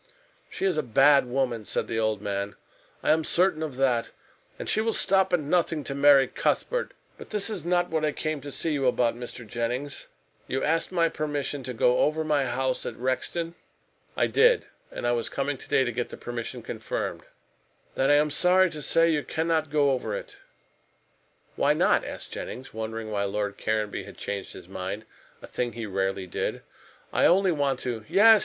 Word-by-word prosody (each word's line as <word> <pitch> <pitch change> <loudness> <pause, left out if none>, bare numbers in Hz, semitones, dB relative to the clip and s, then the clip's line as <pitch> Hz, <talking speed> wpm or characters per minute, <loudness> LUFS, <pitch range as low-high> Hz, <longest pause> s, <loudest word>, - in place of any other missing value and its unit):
"She - - -3
is 185 -5 +1
a - - +3
bad 135 +2 +5
woman," 125 -3 -1
said - - -2
the 115 - -2
old 110 -2 0
man. 100 0 -3 0.5
"I - - +3
am 160 +1 +3
certain 175 -1 +2
of 155 -5 -3
that. 125 -3 +1 0.5
And - - -6
she 215 - +2
will 225 0 0
stop 190 -1 +3
at 180 - +3
nothing 155 0 0
to 140 - -4
marry 140 -1 +6
Cuthbert. - - -1 0.2
But - - -10
this 210 0 0
is 200 -5 -4
not 175 0 +1
what 160 -1 0
I 155 - +2
came 155 0 -3
to 145 +1 -7
see 160 - -1
you 135 -3 +1
about, 120 -2 +2
Mr. 120 0 -7
Jennings. 120 +6 -3 0.4
You 130 - -1
asked 165 +3 +1
my 170 -2 +3
permission 145 -3 -3
to 125 0 -5
go 125 +2 +3
over 155 +1 +2
my 150 -3 +1
house 130 0 -1
at - - -5
Rexton?" 165 +7 -2 0.6
"I - - +4
did. 480 +2 +4 0.2
And - - -6
I 120 - +3
was 120 -1 -1
coming 140 +1 -1
to - - -12
day 135 - +4
to 120 - -1
get 120 +1 -3
the - - -8
permission 120 -1 -5
confirmed." - - -4 0.7
"Then 135 +1 +1
I 145 - +6
am 150 0 +3
sorry 180 +3 +4
to 155 -2 -6
say 165 +3 +3
you 150 -2 0
cannot 160 -1 0
go 145 -2 +3
over 115 -5 -2
it." - - -8 1.2
"Why - - +3
not?" - - +3
asked - - -7
Jennings, 130 +2 -7
wondering 110 0 -5
why 100 -1 0
Lord 100 0 -2
Caranby 110 -1 -1
had - - -12
changed 100 -1 -4
his - - -11
mind 95 +3 -5 0.4
a - - -5
thing 120 -2 -3
he 115 -1 -5
rarely 95 -1 -1
did. 90 - -3 0.5
"I - - +5
only 190 +1 +4
want 140 -4 0
to 115 -3 -3
" - - -23
"Yes! 220 +2 +7
135 Hz, 200 wpm, -27 LUFS, 115-160 Hz, 1.2 s, Yes